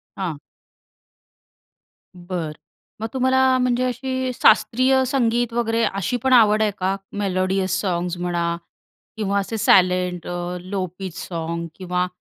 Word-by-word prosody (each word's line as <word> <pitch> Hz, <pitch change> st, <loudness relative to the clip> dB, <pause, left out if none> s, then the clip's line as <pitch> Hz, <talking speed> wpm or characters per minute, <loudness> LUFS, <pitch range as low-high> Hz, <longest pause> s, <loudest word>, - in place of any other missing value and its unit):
हां. 175 Hz, -6 st, -3 dB, 1.8 s
बरं. 175 Hz, -3 st, -5 dB, 0.5 s
मग 225 Hz, -, -1 dB
तुम्हाला 260 Hz, 0 st, +3 dB
म्हणजे 250 Hz, 0 st, +1 dB
अशी 260 Hz, +1 st, -2 dB
शास्त्रीय 260 Hz, +2 st, +4 dB
संगीत 240 Hz, -2 st, +1 dB
वगैरे 230 Hz, -1 st, +1 dB
अशी 195 Hz, +5 st, -1 dB
पण 265 Hz, -1 st, +3 dB
आवड 215 Hz, -3 st, +6 dB
आहे 215 Hz, -1 st, +2 dB
का? 190 Hz, +1 st, 0 dB, 0.2 s
मेलोडियस 185 Hz, -1 st, 0 dB
सॉंग्स 180 Hz, -2 st, -2 dB
म्हणा 175 Hz, -1 st, -1 dB, 0.6 s
किंवा 200 Hz, -2 st, 0 dB
असे 210 Hz, +3 st, -3 dB
सायलेंट 180 Hz, -3 st, +3 dB, 0.4 s
लो 195 Hz, -2 st, -1 dB
पीच 190 Hz, -3 st, -6 dB
सॉंग्स 170 Hz, -1 st, -4 dB
किंवा 180 Hz, -1 st, -1 dB
195 Hz, 120 wpm, -22 LUFS, 180-240 Hz, 1.8 s, आवड